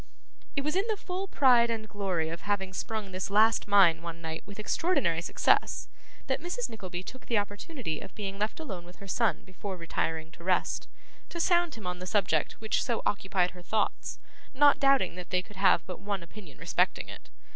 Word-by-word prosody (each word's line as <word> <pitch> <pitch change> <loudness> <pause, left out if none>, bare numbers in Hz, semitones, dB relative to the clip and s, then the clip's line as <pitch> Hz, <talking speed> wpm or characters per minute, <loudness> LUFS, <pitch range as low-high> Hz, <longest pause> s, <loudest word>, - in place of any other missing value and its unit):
It 280 - +1
was 300 +3 -1
in 390 +4 +1
the 435 -2 0
full 380 +1 -4
pride 245 -8 +5
and 220 -1 -2
glory 190 -6 -1
of 165 +1 -5
having 195 -2 -1
sprung 215 0 -4
this 185 +1 -3
last 215 +3 +4
mine 185 -5 +6
one 170 0 -6
night 160 -1 -5
with 200 - -10
extraordinary 210 - +1
success, - - +2 0.4
that - - -1
Mrs. 365 +8 -3
Nickleby 185 -5 -6
took 260 +6 -10
the 230 - +2
opportunity 205 - -3
of - - -10
being 195 -1 -4
left 210 +7 -1
alone 195 - -6
with 175 +1 -13
her 200 - -12
son 225 +3 +1
before 190 +1 -6
retiring 160 -1 -2
to 170 - -14
rest, 185 0 +1 0.4
to 340 - -5
sound 345 -1 +3
him 220 -4 -10
on 180 0 -3
the 185 - -6
subject 180 -7 +1
which 220 -1 -1
so 235 -3 -1
occupied 190 -3 +1
her 180 - -12
thoughts: 215 +4 -1 0.4
not 285 +1 +6
doubting 275 -6 +4
that 180 - -7
they 185 0 +1
could 205 +1 -15
have 185 -3 +4
but 180 - -6
one 200 -2 -3
opinion 170 -4 -12
respecting - - +1
it. - - -10
200 Hz, 200 wpm, -30 LUFS, 180-235 Hz, 0.4 s, mine